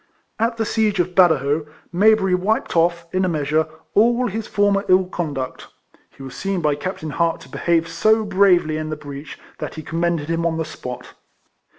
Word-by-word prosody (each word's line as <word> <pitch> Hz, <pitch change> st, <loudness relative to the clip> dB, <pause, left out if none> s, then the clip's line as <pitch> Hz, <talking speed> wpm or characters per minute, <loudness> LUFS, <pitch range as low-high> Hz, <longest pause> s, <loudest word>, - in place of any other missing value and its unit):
At 230 Hz, +1 st, 0 dB
the 225 Hz, -, 0 dB
siege 215 Hz, -3 st, 0 dB
of 180 Hz, +1 st, 0 dB
Badajoz, 155 Hz, -4 st, +3 dB, 0.3 s
Mayberry 200 Hz, 0 st, +4 dB
wiped 190 Hz, +4 st, 0 dB
off, 170 Hz, 0 st, +2 dB
in 185 Hz, 0 st, +1 dB
a 185 Hz, -, +1 dB
measure, 155 Hz, 0 st, 0 dB, 0.3 s
all 235 Hz, +4 st, +3 dB
his 220 Hz, 0 st, -3 dB
former 205 Hz, -1 st, +2 dB
ill 185 Hz, 0 st, +5 dB
conduct. 145 Hz, -8 st, -5 dB, 0.4 s
He 135 Hz, -, -14 dB
was 135 Hz, -, -8 dB
seen 195 Hz, -1 st, -2 dB
by 150 Hz, -3 st, +1 dB
Captain 155 Hz, +1 st, -5 dB
Hart 165 Hz, +1 st, 0 dB
to -, -, -14 dB
behave 165 Hz, -1 st, 0 dB
so 220 Hz, +4 st, +2 dB
bravely 185 Hz, -6 st, +3 dB
in 155 Hz, 0 st, -4 dB
the 155 Hz, -, -3 dB
breach, 145 Hz, -1 st, -9 dB, 0.2 s
that -, -, -5 dB
he 155 Hz, -, -7 dB
commended 165 Hz, -1 st, -1 dB
him 165 Hz, 0 st, -1 dB
on 165 Hz, -1 st, 0 dB
the 160 Hz, -, -2 dB
spot. 125 Hz, -5 st, -8 dB
170 Hz, 185 wpm, -21 LUFS, 155-195 Hz, 0.4 s, ill